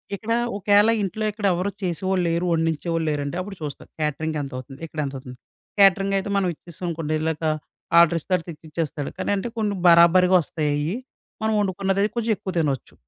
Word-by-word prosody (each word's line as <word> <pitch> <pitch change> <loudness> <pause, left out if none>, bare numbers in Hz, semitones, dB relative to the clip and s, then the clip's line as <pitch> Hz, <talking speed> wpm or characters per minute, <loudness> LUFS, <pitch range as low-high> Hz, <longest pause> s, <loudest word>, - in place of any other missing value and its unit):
ఇక్కడ 225 +3 -2 0.2
ఒకేళ 205 +2 +4
ఇంట్లో 215 +3 -2
ఇక్కడ 210 0 -5
ఎవరు 180 +3 -1
చేసేవాళ్ళు 185 +1 0
లేరు, 170 +2 0
వండించే 165 0 0
వాళ్ళు 165 -1 0
లేరంటే, 145 +2 -3
అప్పుడు 195 +1 -8
చూస్తాను. 145 -2 -7
క్యాటరింగ్ 155 +1 -1
ఎంతవుతుంది. 135 0 -8
ఇక్కడ 155 - -8
ఎంతవుతుంది. 130 -2 -7 0.4
క్యాటరింగ్ 195 0 +5
అయితే 200 +1 -4
మనం 190 -2 +1
ఇచ్చేసాం 170 +3 -9
అనుకోండి. 155 -2 -2 0.8
ఆర్డరిస్తాడు 170 +1 +1
తెచ్చి 160 -1 -10
ఇచ్చేస్తాడు. 150 -2 -3
కానీ, - - -2
అంటే 195 - -3
కొన్ని 205 -2 0
బరాబరీగా 175 +2 +6
ఒస్తాయి 155 -1 -2
అయి. 150 +4 -1 0.5
మనం 220 0 +1
ఒండుకున్నది 195 +1 0
కొంచెం 230 -1 0
ఎక్కువ 190 -1 -5
తినొచ్చు. 140 -6 -2
170 Hz, 160 wpm, -23 LUFS, 155-195 Hz, 0.8 s, బరాబరీగా